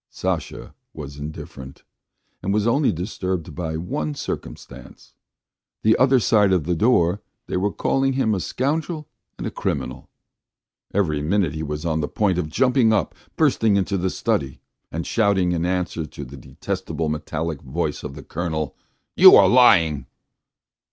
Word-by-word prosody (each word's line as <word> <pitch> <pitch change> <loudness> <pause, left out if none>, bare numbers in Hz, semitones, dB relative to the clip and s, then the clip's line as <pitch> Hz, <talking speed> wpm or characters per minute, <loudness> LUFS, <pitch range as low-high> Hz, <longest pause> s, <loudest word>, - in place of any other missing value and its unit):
Sasha - - -4 0.2
was 75 -2 -8
indifferent, 70 -3 -9 0.6
and 95 - -2
was 105 +1 +1
only 135 +5 +3
disturbed 90 -1 -4
by 80 -3 -3
one 75 -3 -3
circumstance; - - -8 0.7
the 110 +1 +5
other 130 0 +4
side 105 -1 +3
of 90 -4 +2
the 90 - -1
door 90 -1 +2 0.2
they - - -4
were 100 +3 0
calling 135 +5 0
him 130 -5 +1
a 95 - -1
scoundrel 150 - -2 0.3
and - - -5
a - - -3
criminal. - - -4 0.8
Every 80 -7 0
minute 90 +1 +1
he 80 - -5
was 75 +1 -4
on 80 -1 0
the 75 - -1
point 95 -1 0
of 80 -3 -3
jumping 125 - +3
up, 105 -6 +1 0.2
bursting 110 -3 +3
into 100 +1 0
the 95 0 0
study 70 -6 -2 0.3
and 80 +1 -4
shouting 100 -5 +2
in 85 0 0
answer 90 -3 -2
to 75 -1 -9
the 65 +3 -11
detestable 80 +5 -4
metallic 75 0 -3
voice 75 +2 -3
of 70 - -7
the 70 - -9
Colonel: 80 -1 -3 0.4
"You - - +10
are - - +7
lying!" 80 - +5
90 Hz, 155 wpm, -22 LUFS, 75-105 Hz, 0.8 s, You